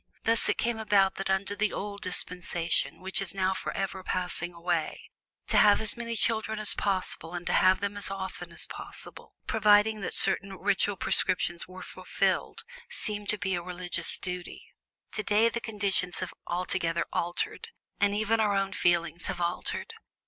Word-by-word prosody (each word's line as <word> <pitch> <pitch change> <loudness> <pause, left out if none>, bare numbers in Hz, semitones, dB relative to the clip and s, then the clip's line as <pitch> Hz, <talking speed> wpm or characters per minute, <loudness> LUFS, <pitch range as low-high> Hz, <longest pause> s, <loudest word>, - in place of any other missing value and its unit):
Thus 230 0 +5
it - - +1
came 235 -1 -1
about 200 -3 +2
that 195 - -4
under 190 +1 -1
the 210 0 0
old 200 0 -6
dispensation, 180 -2 0
which 190 +1 -1
is 195 -1 -4
now 190 0 +1
forever 190 0 -4
passing 180 -1 -1
away, 170 -2 -3 0.3
to - - +2
have 205 -1 +6
as 220 - +5
many 235 -1 -4
children 220 -1 0
as 215 -1 +5
possible 185 -3 -2
and 175 0 -6
to - - -1
have 185 0 +4
them 200 0 -2
as 205 -1 -3
often 190 -1 -6
as - - -4
possible - - -11
providing 210 0 +3
that - - -2
certain 195 -1 +6
ritual 200 +1 0
prescriptions 175 -1 +1
were 185 0 -10
fulfilled - - -2 0.3
seemed 210 - -1
to 210 - +2
be 190 0 -2
a 175 - -1
religious 175 -1 -3
duty. 180 -1 -6 0.5
Today 215 +2 +2
the 235 0 -4
conditions 200 -5 -1
have - - -5
altogether 170 -1 -1
altered, 435 - -3 0.3
and 205 0 +2
even 220 +2 +1
our 210 -2 +2
own 195 0 -1
feelings 170 -1 +1
have - - -4
altered. 175 - -2
195 Hz, 165 wpm, -28 LUFS, 180-210 Hz, 0.5 s, have